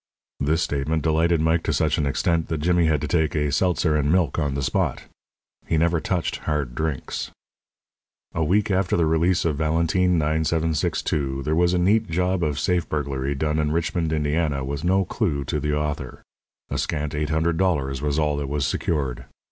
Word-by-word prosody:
This 80 +4 +1
statement 75 +2 -1
delighted 80 +1 +2
Mike 80 +1 +2
to - - +1
such 80 0 +1
an 75 - +1
extent 80 +4 0
that 80 - -2
Jimmy 85 +2 +2
had 75 -3 +1
to - - -2
take 80 -4 +1
a 75 -1 0
seltzer 80 +1 +1
and 75 0 +1
milk 85 -5 +2
on 70 -2 -1
the 70 - -2
spot. - - -1 0.6
He 80 - +1
never 85 +1 +2
touched 90 0 -1
"hard" 75 -5 -2
drinks. 75 +1 -3 1.0
A 85 - 0
week 100 +6 +2
after 95 -2 +1
the 85 - +3
release 80 +3 +2
of 75 -4 0
Valentine, 85 +3 +2
9762, 75 -3 0
there 75 +3 -1
was 85 +2 +3
a - - +2
neat 105 +4 +2
job 90 +2 0
of 75 -2 -1
safe 90 +1 0
burglary 70 -2 -2
done 75 +2 0
in 75 -1 0
Richmond, 80 0 -1
Indiana, 75 -2 0
with 70 +2 -4
no 95 +2 +2
clue 80 -9 -1
to 75 - -2
the 75 +1 -1
author. 75 -3 -4 0.5
A - - -1
scant 75 0 -2
eight 75 0 -2
hundred 80 +1 +1
dollars 70 -8 0
was 75 0 -1
all 75 -2 +1
that 70 -2 -3
was 70 -1 -1
secured. 70 -6 -2
80 Hz, 190 wpm, -23 LUFS, 75-85 Hz, 1.0 s, the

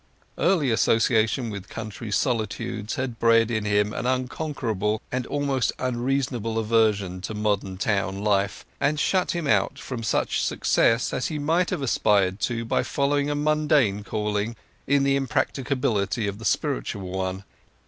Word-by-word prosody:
Early 155 -10 +3
association 115 +1 +2
with 100 -2 -7
country 110 0 -6
solitudes 110 -1 -1
had 125 -3 -4
bred 115 0 +4
in 110 -2 -1
him 105 0 +1
an 120 - -2
unconquerable, 125 -5 -1
and 125 -1 -2
almost 140 -5 0
unreasonable, 125 -2 -1
aversion 105 -5 +1
to 105 +3 -5
modern 100 -3 -1
town 100 -1 -1
life, 100 -1 0
and 150 +1 +1
shut 185 +2 +1
him 170 -2 -2
out 140 - +2
from 125 -3 -6
such 110 - 0
success 115 +1 +2
as 125 - -1
he 155 - -3
might 165 +5 +1
have 140 - -2
aspired 100 -6 +2
to 115 -1 -3
by - - +1
following 145 +1 0
a 145 - 0
mundane 145 -8 +2
calling 105 +2 -2 0.3
in 140 0 +3
the 140 0 +3
impracticability 130 -5 0
of 100 +1 -4
the 115 - -8
spiritual 95 +2 -1
one. 95 +1 -3
115 Hz, 150 wpm, -25 LUFS, 105-135 Hz, 0.3 s, bred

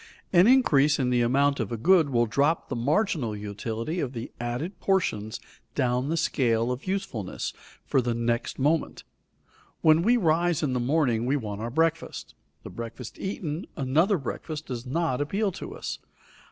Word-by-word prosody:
An 180 +3 +7
increase 150 - +5
in 125 -2 0
the 120 -1 +3
amount 140 +4 +2
of 110 -3 -2
a 115 - -2
good 165 - +4
will 120 -3 +2
drop 140 +8 +1
the - - -2
marginal 140 - 0
utility 110 - -4
of 135 -5 -2
the 115 -1 -6
added 125 +11 -4
portions 110 - 0 0.4
down 125 0 +1
the 165 - 0
scale 120 -7 +1
of 125 +8 -5
usefulness 185 - -3 0.3
for 135 - +2
the 120 -1 -1
next 115 0 -1
moment. 150 +4 0 0.8
When 155 0 +5
we 235 +7 +4
rise 170 -3 +2
in 135 -4 0
the 125 - 0
morning, 125 -3 +1
we 135 - +2
want 105 -5 -5
our 115 - -3
breakfast; 165 +4 -1 0.3
the - - -8
breakfast 115 +4 -8
eaten, 175 -4 -4
another 160 +9 +2
breakfast 155 +2 -5
does 125 -1 -6
not 150 -1 0
appeal 195 +8 0
to 180 - -8
us. - - -5
140 Hz, 165 wpm, -27 LUFS, 120-165 Hz, 0.8 s, An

